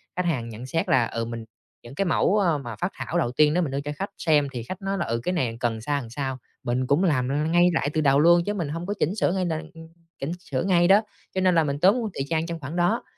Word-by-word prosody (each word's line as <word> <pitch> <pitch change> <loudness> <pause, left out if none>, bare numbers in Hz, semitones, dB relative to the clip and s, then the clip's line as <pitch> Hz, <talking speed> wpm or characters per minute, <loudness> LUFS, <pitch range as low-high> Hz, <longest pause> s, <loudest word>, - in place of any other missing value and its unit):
khách 180 -1 -1
hàng 125 -9 -1
nhận 115 +3 -8
xét 165 +5 -2
là, 125 -3 +4
ừ, 115 0 -3
mình 115 -1 -6 0.4
những 120 +4 -11
cái 195 - 0
mẫu, 190 +4 +2
a, 170 -6 +2
mà 120 -5 -7
phác 180 - -2
thảo 175 - -3
đầu 120 -8 +1
tiên 150 +3 +4
đó 180 - +2
mình 145 -5 -2
đưa 140 +1 -2
cho 145 +1 -4
khách 195 +4 -4
xem 150 -3 +2
thì 120 -3 -5
khách 185 - -7
nói 195 0 -2
là, - - -1
ừ, 115 +1 -1
cái 180 - -1
này 120 -8 -1
cần 120 -2 0
làm 110 - -7
sao, 145 +3 -1
làm 115 - -9
sao, 130 +1 -3 0.3
mình 125 +1 -1
cũng 150 +7 +3
làm 145 0 +1
ngay 175 +1 +5
lại 145 - 0
từ 155 - +1
đầu 140 -1 +4
luôn 170 +2 +5
chứ 205 - -1
mình 170 -8 -3
hông 165 +3 -4
có 205 - -2
chỉnh 175 +7 +1
sửa 190 - +1
ngay 185 -1 0
là 160 -2 -2 0.6
chỉnh 140 +4 -3
sửa 140 -7 -3
ngay 175 -2 +3
đó. 200 +3 +6 0.3
Cho 190 - +1
nên 185 -2 +3
là 165 - +4
mình 140 -1 -2
tốn 215 +5 +3
thời 135 - -2
gian 160 0 0
trong 165 -1 -5
khoảng 145 +4 -6
đó! 180 +7 +1
155 Hz, 290 wpm, -25 LUFS, 130-180 Hz, 0.6 s, đó